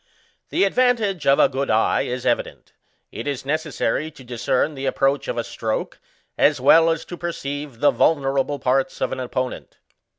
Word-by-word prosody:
The -, -, +1 dB
advantage 215 Hz, -4 st, +1 dB
of 140 Hz, -, +5 dB
a -, -, +5 dB
good 135 Hz, +1 st, -3 dB
eye 110 Hz, 0 st, +2 dB
is 125 Hz, 0 st, -4 dB
evident; -, -, -2 dB, 0.4 s
it -, -, -6 dB
is 140 Hz, -2 st, -3 dB
necessary 155 Hz, -1 st, -1 dB
to 145 Hz, -4 st, -15 dB
discern 125 Hz, +4 st, -1 dB
the 135 Hz, -1 st, -4 dB
approach 135 Hz, +1 st, +1 dB
of -, -, -3 dB
a 120 Hz, -, 0 dB
stroke, 110 Hz, -1 st, -4 dB, 0.4 s
as -, -, +4 dB
well 165 Hz, 0 st, +6 dB
as 165 Hz, -1 st, -1 dB
to 175 Hz, -, -7 dB
perceive 145 Hz, -6 st, -5 dB
the 145 Hz, -, +5 dB
vulnerable 140 Hz, -2 st, +1 dB
parts 130 Hz, 0 st, 0 dB
of -, -, -1 dB
an 130 Hz, -, -4 dB
opponent. 130 Hz, 0 st, -4 dB
140 Hz, 170 wpm, -22 LUFS, 130-160 Hz, 0.4 s, well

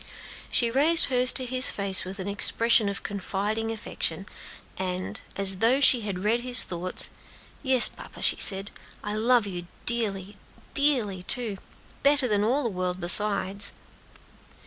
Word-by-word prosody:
She 235 Hz, -2 st, 0 dB
raised 310 Hz, +6 st, +4 dB
hers 250 Hz, 0 st, +4 dB
to 260 Hz, -, +1 dB
his 255 Hz, +1 st, +4 dB
face 200 Hz, -1 st, +3 dB
with 190 Hz, +1 st, -8 dB
an 190 Hz, 0 st, -7 dB
expression 215 Hz, +2 st, +2 dB
of 200 Hz, -, -7 dB
confiding 205 Hz, +3 st, -5 dB
affection; 225 Hz, -1 st, -4 dB, 0.5 s
and, 185 Hz, -1 st, -6 dB
as 195 Hz, -1 st, +2 dB
though 235 Hz, +7 st, +1 dB
she 255 Hz, -3 st, +5 dB
had 195 Hz, -3 st, -6 dB
read 225 Hz, +3 st, 0 dB
his 250 Hz, 0 st, +2 dB
thoughts: 180 Hz, +1 st, -3 dB, 0.5 s
"Yes, 260 Hz, -3 st, +4 dB
papa," -, -, -12 dB
she -, -, +2 dB
said, 195 Hz, 0 st, +3 dB, 0.3 s
"I 210 Hz, -, -5 dB
love 230 Hz, +1 st, +1 dB
you 175 Hz, -3 st, -8 dB, 0.2 s
dearly, 205 Hz, -4 st, -1 dB, 0.4 s
dearly, 245 Hz, -10 st, +2 dB
too; 210 Hz, +1 st, 0 dB, 0.4 s
better 280 Hz, -2 st, +1 dB
than 205 Hz, -2 st, -1 dB
all 260 Hz, +7 st, -1 dB
the 235 Hz, -, -2 dB
world 180 Hz, -2 st, -5 dB
besides." 200 Hz, +2 st, +1 dB
210 Hz, 145 wpm, -24 LUFS, 195-245 Hz, 0.5 s, she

